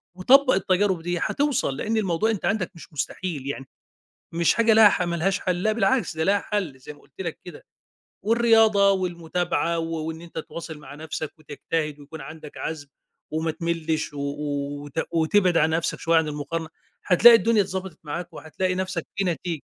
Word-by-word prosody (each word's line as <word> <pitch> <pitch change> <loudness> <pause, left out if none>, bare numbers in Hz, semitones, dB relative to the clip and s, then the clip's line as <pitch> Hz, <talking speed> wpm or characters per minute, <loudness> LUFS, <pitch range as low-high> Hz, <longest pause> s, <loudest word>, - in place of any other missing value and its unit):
وطبَّق 260 +9 +5
التجارب 190 -1 +1
دي 175 +1 -2
هتوصَل 275 - 0
لأن 225 +7 -1
الموضوع 205 +1 +1
أنت 205 -6 -3
عَندك 190 0 0
مش 165 - -13
مستحيل، 150 -1 -4
يعني 135 -1 -5 0.6
مش 170 0 +2
حاجة 230 -1 +4
لها 215 -1 +8
حَ 185 - -1
ما 170 -1 -2
لهاش 185 +3 0
حَل 180 -1 -1
لأ 215 - +3
بالعكس 220 -3 +1
ده 160 - +1
لها 200 +3 +3
حَل 195 -10 -3
زي 130 - -10
ما 145 - -20
قُلت - - -12
لك 165 -4 -5
كده. 175 -4 -11 0.6
والرياضة 220 -2 +4
والمتابعة 175 -2 -1
و 165 -1 -3
وإن 160 0 -5
أنت 170 -1 -9
تواصِل 160 0 -7
مع 145 -2 -11
نَفسك 155 0 -5
وتجتهد 150 0 -4
ويكون 150 +2 -10
عَندك 150 +1 -10
عَزم 155 -3 -5 0.4
وما 160 +1 -1
تملِّش 165 -1 -2
و - - -7
و 145 0 -3
وت 145 +3 -3
وتبعِد 175 +2 +3
عن 155 0 +4
نَفسك 160 +1 -1
شوية 165 0 +3
عن 160 -1 0
المقارنة 150 +2 -4 0.4
هتلاقي 230 +6 +8
الدنيا 225 0 +3
اتضبَطِت 190 -3 -6
معاك 170 +4 -5
وهتلاقي 185 +4 -3
نَفسك 185 -2 -3
في 195 - 0
نتيجة. 170 -3 -2
170 Hz, 180 wpm, -24 LUFS, 155-195 Hz, 0.6 s, لها